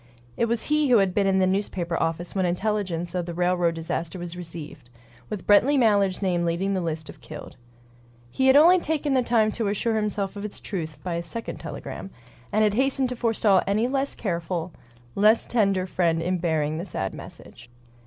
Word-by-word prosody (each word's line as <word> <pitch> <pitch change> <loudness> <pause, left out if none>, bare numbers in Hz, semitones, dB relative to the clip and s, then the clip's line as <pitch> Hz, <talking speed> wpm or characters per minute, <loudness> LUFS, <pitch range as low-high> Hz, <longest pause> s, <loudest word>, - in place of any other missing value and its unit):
It - - +1
was 230 0 -1
he 300 -2 +1
who 245 - +6
had 195 -3 +2
been 200 0 +2
in 190 0 +3
the 190 - +4
newspaper 185 -3 -1
office 165 +1 -2
when 190 - 0
intelligence 180 -2 -1
of 180 -1 -2
the 170 - -5
railroad 175 -1 +1
disaster 165 +1 -3
was 175 -1 -6
received, 160 -7 -8 0.4
with 205 -4 -5
Brently 255 +8 +5
Mallard's 205 -5 +2
name 175 -2 +1
leading 170 +4 0
the 190 - 0
list 160 -2 -3
of - - -12
"killed." 155 -1 -10 0.8
He 265 - +1
had 265 - +6
only 345 +5 +7
taken 300 -3 -1
the 260 - +3
time 230 -3 +2
to 225 -1 -2
assure 220 +3 0
himself 210 -2 -2
of 200 - -6
its 210 - -6
truth 160 -7 -5
by 175 -2 -2
a - - -2
second 225 +7 -6
telegram, 195 - -7 0.4
and 215 - +3
had 210 -1 +3
hastened 265 +2 +1
to 250 - -4
forestall 225 -5 +3
any 215 +4 +2
less 270 +1 -1
careful, 175 -3 -3 0.4
less 215 +3 +4
tender 195 -5 +1
friend 170 -3 +1
in 180 +2 -1
bearing 155 -2 0
the 175 - -4
sad 95 - -3
message. - - -12
190 Hz, 195 wpm, -25 LUFS, 170-220 Hz, 0.8 s, only